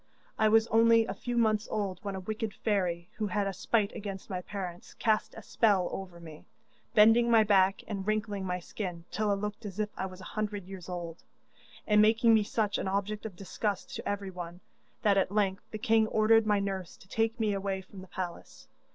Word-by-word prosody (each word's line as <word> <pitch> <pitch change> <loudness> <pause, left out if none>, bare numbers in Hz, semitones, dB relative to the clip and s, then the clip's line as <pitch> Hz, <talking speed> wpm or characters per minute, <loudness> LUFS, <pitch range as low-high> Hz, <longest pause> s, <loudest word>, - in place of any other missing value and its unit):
I 215 0 +5
was 225 +1 +5
only 230 0 +5
a - - -4
few 245 -1 -4
months 220 -1 +2
old 195 -4 -2
when 200 -1 -4
a - - -4
wicked 215 +2 -4
fairy, 180 -5 -1
who 215 -1 -1
had 205 0 0
a 195 - -2
spite 205 +2 0
against 195 -2 -6
my 180 -1 -2
parents, 180 -3 -7
cast 220 -2 0
a - - -9
spell 200 -6 +2
over 185 -3 -7
me, 160 -2 -12 0.5
bending 225 +3 +6
my 225 -2 +6
back 195 -2 +3
and 200 -2 -4
wrinkling 210 -2 -1
my 180 -1 -2
skin 175 -2 -6
till 215 -1 0
I 200 - +3
looked 210 +2 -5
as 205 -1 -7
if 215 0 0
I 190 - -3
was 185 0 -11
a - - -11
hundred 210 -3 -3
years 185 -1 -9
old, 175 -2 -6 0.6
and 210 -1 +5
making 225 +2 +5
me 220 - +5
such 210 0 -1
an - - -2
object 205 +3 -2
of 200 - -12
disgust 200 +2 -3
to - - -4
everyone, 180 -3 -5 0.4
that 200 -2 +4
at 190 - 0
length 200 -2 0
the 215 - -5
king 220 0 +3
ordered 220 0 +4
my 210 -1 +3
nurse 195 -3 -4
to - - -18
take 225 +3 0
my 220 -1 +1
away 195 -1 -2
from 190 0 -12
the 190 - -11
palace. 180 -2 -7
205 Hz, 210 wpm, -30 LUFS, 190-215 Hz, 0.6 s, bending